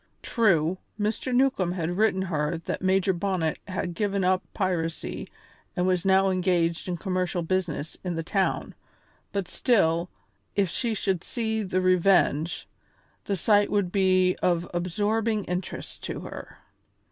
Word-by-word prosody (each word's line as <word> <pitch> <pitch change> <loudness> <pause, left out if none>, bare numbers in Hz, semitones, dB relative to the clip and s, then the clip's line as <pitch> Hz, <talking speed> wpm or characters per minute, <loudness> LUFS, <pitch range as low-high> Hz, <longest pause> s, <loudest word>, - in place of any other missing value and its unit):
True, 185 -6 +2 0.2
Mr. 215 +4 -1
Newcombe 245 -9 +2
had 175 -1 -2
written 195 -2 +2
her 155 -3 -1
that - - -3
Major 190 0 +2
Bonnet 175 -3 -1
had 185 -2 -3
given 200 +1 0
up 185 0 +3
piracy 170 -4 -2 0.5
and 180 -2 +1
was 185 0 +1
now 190 0 +4
engaged 175 -2 +1
in 180 -1 -2
commercial 185 -1 -1
business 165 -4 -2
in 180 -2 -2
the 165 - -2
town, 190 +3 0 0.6
but 200 -2 -2
still, 175 -8 +2 0.5
if 200 -3 +2
she 235 -3 -1
should 190 -4 -1
see 220 -3 -2
the 185 -2 0
Revenge, 180 -3 +2 0.6
the 200 - -1
sight 205 +3 +3
would 200 -4 +1
be 185 -1 +3
of 175 -1 +1
absorbing 210 +5 0
interest 180 0 -5
to - - -4
her. - - -9
185 Hz, 140 wpm, -26 LUFS, 175-200 Hz, 0.6 s, now